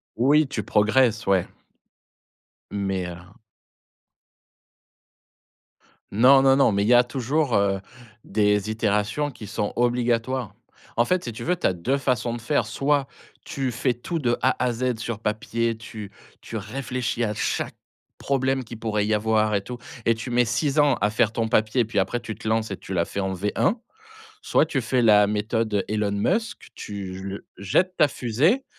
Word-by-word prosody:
Oui, 145 Hz, +5 st, +4 dB
tu 105 Hz, -6 st, -4 dB
progresses, 110 Hz, +2 st, +2 dB
ouais. 95 Hz, -2 st, +2 dB, 1.2 s
Mais 95 Hz, -3 st, -2 dB
heu 85 Hz, -, -7 dB, 3.0 s
Non, 130 Hz, +6 st, +6 dB
non, 135 Hz, 0 st, +5 dB
non, 135 Hz, -5 st, +4 dB
mais 100 Hz, 0 st, +1 dB
il 105 Hz, -, 0 dB
y 125 Hz, -, +5 dB
a 120 Hz, 0 st, +7 dB
toujours, 130 Hz, +2 st, -1 dB
heu, 100 Hz, -1 st, +2 dB, 0.4 s
des 105 Hz, 0 st, +1 dB
itérations 110 Hz, +6 st, 0 dB
qui 125 Hz, -5 st, -10 dB
sont 105 Hz, +1 st, -3 dB
obligatoires. 120 Hz, -2 st, 0 dB, 0.4 s
En 120 Hz, -, +4 dB
fait, 185 Hz, -4 st, 0 dB
si 120 Hz, -, -5 dB
tu 110 Hz, -, -7 dB
veux, 180 Hz, +1 st, 0 dB
tu -, -, +1 dB
as 95 Hz, -, +1 dB
2 110 Hz, +11 st, -1 dB
façons 125 Hz, -4 st, 0 dB
de 120 Hz, -, -5 dB
faire. 120 Hz, 0 st, +1 dB
Soit 140 Hz, +5 st, 0 dB, 0.4 s
tu 135 Hz, -6 st, -2 dB
fais 125 Hz, +1 st, 0 dB
tout, 145 Hz, +8 st, -4 dB
de 120 Hz, -4 st, +1 dB
A 130 Hz, 0 st, +3 dB
à 125 Hz, -, +2 dB
Z 125 Hz, +1 st, -1 dB
sur 110 Hz, -1 st, -4 dB
papier, 115 Hz, +1 st, -1 dB
tu 110 Hz, -2 st, -9 dB, 0.3 s
tu 115 Hz, -, -9 dB
réfléchis 120 Hz, +2 st, -3 dB
à 105 Hz, -, -2 dB
chaque -, -, -2 dB, 0.4 s
problème 135 Hz, -1 st, 0 dB
qu'il 115 Hz, -1 st, -10 dB
pourrait 105 Hz, -2 st, 0 dB
y 110 Hz, -, +1 dB
avoir 110 Hz, 0 st, +2 dB
et 100 Hz, -, +1 dB
tout, 120 Hz, +4 st, -7 dB, 0.3 s
et 115 Hz, -, +3 dB
tu 115 Hz, +3 st, -6 dB
mets 120 Hz, 0 st, +3 dB
6 135 Hz, +5 st, 0 dB
ans 145 Hz, -2 st, +4 dB
à 105 Hz, -, +3 dB
faire 110 Hz, 0 st, +2 dB
ton 115 Hz, -1 st, -1 dB
papier. 110 Hz, +3 st, +2 dB
Puis 105 Hz, -2 st, -1 dB
après, 120 Hz, +5 st, 0 dB
tu 110 Hz, -, -6 dB
te 110 Hz, +1 st, -8 dB
lances 110 Hz, -1 st, 0 dB
et 95 Hz, -, -4 dB
tu 95 Hz, -, -8 dB
la 85 Hz, -2 st, +2 dB
fais 100 Hz, -, -5 dB
en 95 Hz, -1 st, -1 dB
V1. 105 Hz, -, 0 dB, 0.7 s
Soit 155 Hz, -, +2 dB
tu 140 Hz, -4 st, -1 dB
fais 125 Hz, +2 st, +1 dB
la 105 Hz, -2 st, +6 dB
méthode 105 Hz, 0 st, -1 dB
Elon 105 Hz, -1 st, 0 dB
Musk, 200 Hz, -, -1 dB
tu 95 Hz, -3 st, -6 dB
l 100 Hz, -, -6 dB, 0.2 s
jettes 180 Hz, -, 0 dB
ta 150 Hz, -, +5 dB
fusée, 145 Hz, -, +1 dB
115 Hz, 175 wpm, -24 LUFS, 105-130 Hz, 3.0 s, a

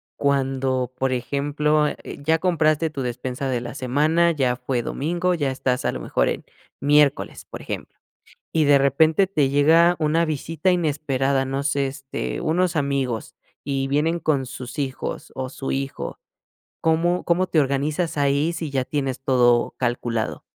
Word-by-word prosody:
cuando, 135 Hz, -2 st, 0 dB
por 130 Hz, 0 st, 0 dB
ejemplo, 145 Hz, +4 st, +1 dB
eh, -, -, -5 dB, 0.3 s
ya 160 Hz, +2 st, +3 dB
compraste 160 Hz, -2 st, +2 dB
tu 145 Hz, -3 st, -5 dB
despensa 125 Hz, +2 st, -3 dB
de 125 Hz, -2 st, 0 dB
la 120 Hz, +1 st, -6 dB
semana, 155 Hz, +7 st, +2 dB
ya 130 Hz, -6 st, +1 dB
fue 125 Hz, 0 st, -2 dB
domingo, 175 Hz, +9 st, -1 dB
ya 145 Hz, -6 st, 0 dB
estás 130 Hz, -1 st, -1 dB
a -, -, +1 dB
lo -, -, -5 dB
mejor -, -, 0 dB
en -, -, -4 dB, 0.3 s
miércoles, 145 Hz, 0 st, +2 dB
por -, -, -8 dB
ejemplo, -, -, -7 dB, 0.5 s
y 160 Hz, -1 st, +3 dB
de 140 Hz, -1 st, +6 dB
repente 155 Hz, +7 st, +3 dB
te 155 Hz, -8 st, +1 dB
llega 165 Hz, +5 st, +5 dB
una 160 Hz, +2 st, +2 dB
visita 160 Hz, +3 st, -1 dB
inesperada? 140 Hz, -5 st, +1 dB
No 135 Hz, +1 st, -3 dB
sé, 140 Hz, -1 st, +1 dB
este, 135 Hz, -, -5 dB
unos 175 Hz, +2 st, +1 dB
amigos 135 Hz, -6 st, -1 dB, 0.3 s
y 135 Hz, -1 st, -1 dB
vienen 160 Hz, +5 st, +1 dB
con 140 Hz, -5 st, 0 dB
sus 125 Hz, 0 st, -8 dB
hijos 135 Hz, -2 st, -4 dB
o 130 Hz, 0 st, -4 dB
su 135 Hz, +1 st, -5 dB
hijo. 135 Hz, 0 st, -4 dB, 0.6 s
¿Cómo 170 Hz, +2 st, +1 dB
cómo 180 Hz, +2 st, +1 dB
te 160 Hz, -, +2 dB
organizas 145 Hz, +4 st, 0 dB
ahí 145 Hz, +3 st, +2 dB
si 165 Hz, -2 st, -4 dB
ya 135 Hz, -2 st, -1 dB
tienes 135 Hz, -3 st, -2 dB
todo 125 Hz, -3 st, +3 dB
calculado? 120 Hz, -2 st, -2 dB
140 Hz, 160 wpm, -23 LUFS, 130-160 Hz, 0.6 s, de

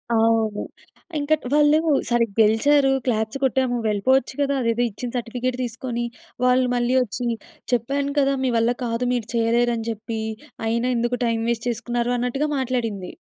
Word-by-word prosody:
అవును. 225 Hz, -2 st, +2 dB, 0.6 s
ఇంకా 295 Hz, +2 st, +2 dB, 0.2 s
వాళ్ళు 300 Hz, +1 st, +5 dB, 0.3 s
సరే 240 Hz, -1 st, +3 dB
గెలిచారు. 270 Hz, +6 st, +4 dB
క్లాప్స్ 220 Hz, +1 st, 0 dB
కొట్టాము. 260 Hz, -1 st, +1 dB
వెళ్ళిపోవచ్చు 245 Hz, +6 st, +2 dB
గదా! 280 Hz, 0 st, +1 dB
అదేదో 230 Hz, +1 st, +1 dB
ఇచ్చిన 240 Hz, +4 st, -6 dB
సర్టిఫికేట్ 245 Hz, +1 st, -3 dB
తీసుకొని. 240 Hz, 0 st, -3 dB, 0.4 s
వాళ్ళు 255 Hz, 0 st, +4 dB
మళ్ళీ 245 Hz, +1 st, +1 dB
వచ్చి 240 Hz, +1 st, -3 dB, 0.5 s
చెప్పాను 280 Hz, +4 st, 0 dB
కదా! 275 Hz, 0 st, +2 dB
మీ 255 Hz, -, +1 dB
వల్ల 230 Hz, +2 st, +2 dB
కాదు, 230 Hz, +1 st, -1 dB
మీరు 235 Hz, -3 st, -2 dB
చేయలేరని 235 Hz, 0 st, +1 dB
జెప్పి, 220 Hz, 0 st, -4 dB, 0.5 s
అయినా 235 Hz, +2 st, 0 dB
ఎందుకు 240 Hz, +1 st, 0 dB
టైమ్ 225 Hz, -1 st, 0 dB
వేస్ట్ 235 Hz, +1 st, -1 dB
చేసుకున్నారు 240 Hz, +1 st, -1 dB
అన్నట్టుగా 270 Hz, +5 st, -1 dB
మాట్లాడింది. 230 Hz, -7 st, -2 dB
240 Hz, 140 wpm, -23 LUFS, 230-255 Hz, 0.6 s, వాళ్ళు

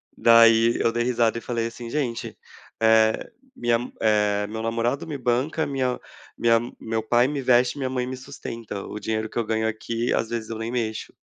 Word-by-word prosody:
Daí, 115 Hz, 0 st, +6 dB
eu 115 Hz, -, +2 dB
dei 120 Hz, +1 st, 0 dB
risada 120 Hz, -2 st, +1 dB
e -, -, -5 dB
falei 115 Hz, -1 st, -2 dB
assim: 115 Hz, 0 st, -8 dB
"Gente, 125 Hz, -4 st, -3 dB, 0.4 s
eh, 110 Hz, 0 st, +3 dB, 0.2 s
minha, 120 Hz, +1 st, 0 dB
eh, 105 Hz, -2 st, +2 dB
meu 110 Hz, +1 st, -5 dB
namorado 115 Hz, +5 st, -1 dB
me 155 Hz, -3 st, -5 dB
banca, 130 Hz, +6 st, 0 dB
minha 130 Hz, -3 st, -1 dB, 0.4 s
minha 115 Hz, -1 st, +4 dB
ma 120 Hz, -, -6 dB
meu 110 Hz, 0 st, -2 dB
pai 120 Hz, +3 st, +3 dB
me 140 Hz, -1 st, -3 dB
veste 125 Hz, 0 st, +3 dB
e -, -, -8 dB
minha 130 Hz, -2 st, -1 dB
mãe 125 Hz, -1 st, -2 dB
me 130 Hz, -, -4 dB
sustenta, 115 Hz, -6 st, -7 dB
o 105 Hz, -, -6 dB
dinheiro 110 Hz, +1 st, -2 dB
que -, -, -8 dB
eu 115 Hz, -, 0 dB
ganho 110 Hz, 0 st, 0 dB
aqui, 115 Hz, +2 st, -2 dB
às 115 Hz, -, 0 dB
vezes, 115 Hz, -2 st, -4 dB
eu 115 Hz, -, -4 dB
nem 110 Hz, +1 st, -4 dB
mexo.". 115 Hz, -3 st, -3 dB
115 Hz, 200 wpm, -24 LUFS, 110-125 Hz, 0.4 s, Daí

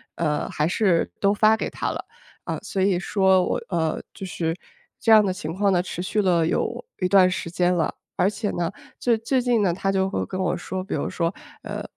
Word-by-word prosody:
呃， 150 Hz, -3 st, -1 dB
还 150 Hz, -, 0 dB
是 180 Hz, -1 st, +2 dB
都 200 Hz, 0 st, +4 dB
发 215 Hz, +1 st, +5 dB
给 -, -, -3 dB
她 -, -, -3 dB
了， -, -, -5 dB, 0.4 s
啊。 -, -, -3 dB
所 190 Hz, -, -2 dB
以 190 Hz, -2 st, +2 dB
说 190 Hz, 0 st, +3 dB
我 -, -, -1 dB
呃， 160 Hz, -4 st, 0 dB
就 195 Hz, -, -6 dB
是 165 Hz, -3 st, -2 dB, 0.4 s
这 225 Hz, -, +2 dB
样 215 Hz, -1 st, +8 dB
的 190 Hz, -, +1 dB
情 165 Hz, -3 st, -5 dB
况 200 Hz, +1 st, +2 dB
呢， 175 Hz, -2 st, +3 dB
持 175 Hz, -, -5 dB
续 210 Hz, +3 st, 0 dB
了 170 Hz, -4 st, +3 dB
有 -, -, -1 dB, 0.2 s
一 185 Hz, -, +1 dB
段 185 Hz, -1 st, +6 dB
时 180 Hz, -2 st, -3 dB
间 180 Hz, +1 st, +2 dB
了。 165 Hz, -3 st, 0 dB, 0.2 s
而 185 Hz, -, +3 dB
且 210 Hz, 0 st, -3 dB
呢， 170 Hz, 0 st, -2 dB, 0.3 s
最 235 Hz, -2 st, +2 dB
最 250 Hz, +4 st, 0 dB
近 240 Hz, -3 st, +2 dB
呢， 180 Hz, -3 st, +2 dB
她 195 Hz, +2 st, -1 dB
就 190 Hz, -1 st, +1 dB
会 195 Hz, -, -2 dB
跟 185 Hz, -, -5 dB
我 185 Hz, -2 st, 0 dB
说， 185 Hz, +1 st, -4 dB
比 190 Hz, -, -6 dB
如 -, -, -1 dB
说， 170 Hz, -1 st, -1 dB, 0.3 s
呃， -, -, -5 dB
185 Hz, 240 characters per minute, -24 LUFS, 175-200 Hz, 0.4 s, 样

